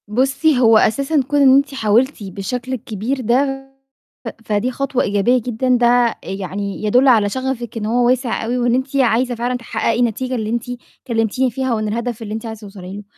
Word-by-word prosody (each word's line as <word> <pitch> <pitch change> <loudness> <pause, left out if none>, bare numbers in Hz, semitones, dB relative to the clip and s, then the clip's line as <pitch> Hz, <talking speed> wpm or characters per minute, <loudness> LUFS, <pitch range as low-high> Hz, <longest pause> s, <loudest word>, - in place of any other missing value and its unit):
بُصي، 270 +6 +1
هو 225 -3 +6
أساسًا 275 +8 +2
كون 290 0 +1
إن 265 -1 +7
أنتِ 280 +1 +2
حاولتِ 235 +1 +1
بالشكل 235 +7 -5
الكبير 235 +2 -3
ده، 270 +3 0 0.7
فدي 210 +4 0
خطوة 270 0 -1
إيجابية 205 +5 +2
جدًا، 250 +2 0
ده 240 -1 +3
يعني 195 +1 -5
يدل 250 +6 +4
على 220 -5 +4
شغفِك 250 -1 -4
إن 215 - -3
هو 240 +2 +2
واسع 250 -2 0
أوي، 245 +2 -1
وإن 240 -1 +1
أنتِ 260 +2 -3
عايزة 245 -1 +2
فعلًا 245 +2 -2
تحققي 235 -1 -2
النتيجة 250 +2 -1
اللي 220 -3 -3
أنتِ 235 +1 -1 0.4
كلمتيني 235 +2 0
فيها، 260 +1 -2
وإن 215 -1 -1
الهدف 235 +1 -3
اللي 215 -1 -6
أنتِ 220 +1 -5
عايزة 220 -1 -7
توصلي 195 -2 -9
له، 205 - -9
240 Hz, 180 wpm, -18 LUFS, 215-260 Hz, 0.7 s, إن